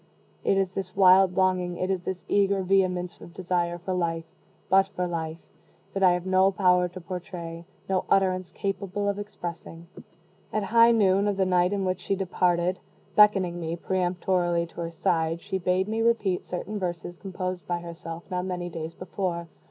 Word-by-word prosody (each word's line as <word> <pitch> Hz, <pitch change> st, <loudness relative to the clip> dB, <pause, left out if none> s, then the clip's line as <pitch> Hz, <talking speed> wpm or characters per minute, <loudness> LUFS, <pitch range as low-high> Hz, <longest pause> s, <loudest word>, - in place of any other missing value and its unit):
It 195 Hz, -, +2 dB
is 190 Hz, -1 st, +1 dB
this 190 Hz, -1 st, -5 dB
wild 185 Hz, -1 st, +6 dB
longing 185 Hz, -2 st, +1 dB
it 185 Hz, +1 st, -1 dB
is 190 Hz, -2 st, -1 dB
this 185 Hz, 0 st, -5 dB
eager 200 Hz, -1 st, +2 dB
vehemence 180 Hz, -2 st, +1 dB
of 170 Hz, -, -12 dB
desire 175 Hz, -2 st, -1 dB
for 180 Hz, +2 st, -4 dB
life 165 Hz, -2 st, -1 dB, 0.4 s
but 195 Hz, 0 st, +4 dB
for 180 Hz, -, 0 dB
life 165 Hz, -2 st, -3 dB, 0.6 s
that 195 Hz, -, -2 dB
I 185 Hz, -2 st, +6 dB
have 180 Hz, 0 st, -2 dB
no 190 Hz, 0 st, +4 dB
power 180 Hz, -2 st, +3 dB
to 180 Hz, +1 st, -9 dB
portray 170 Hz, -1 st, -7 dB, 0.2 s
no 190 Hz, -1 st, 0 dB
utterance 185 Hz, -2 st, +2 dB
capable 200 Hz, +1 st, -3 dB
of 200 Hz, 0 st, -1 dB
expressing. 175 Hz, -4 st, -7 dB, 0.7 s
At 215 Hz, -, 0 dB
high 230 Hz, +3 st, +6 dB
noon 200 Hz, -3 st, +3 dB
of 200 Hz, -1 st, 0 dB
the 190 Hz, -, +2 dB
night 180 Hz, 0 st, +3 dB
in 200 Hz, -1 st, -1 dB
which 185 Hz, 0 st, -1 dB
she 195 Hz, -, -1 dB
departed, 180 Hz, -1 st, +1 dB, 0.4 s
beckoning 195 Hz, -4 st, +5 dB
me, 165 Hz, 0 st, -3 dB
peremptorily, 175 Hz, -1 st, 0 dB
to 170 Hz, -, -9 dB
her 165 Hz, 0 st, -4 dB
side, 165 Hz, -1 st, 0 dB
she 190 Hz, +2 st, -3 dB
bade 185 Hz, +1 st, +1 dB
me 220 Hz, +1 st, -1 dB
repeat 225 Hz, -6 st, +1 dB
certain 205 Hz, +4 st, -4 dB
verses 175 Hz, -1 st, -4 dB
composed 185 Hz, -2 st, -5 dB
by 175 Hz, -1 st, -1 dB
herself 170 Hz, 0 st, -8 dB
not 180 Hz, 0 st, -1 dB
many 175 Hz, -1 st, -3 dB
days 165 Hz, -1 st, -6 dB
before. 180 Hz, -2 st, -4 dB
185 Hz, 175 wpm, -26 LUFS, 175-195 Hz, 0.7 s, wild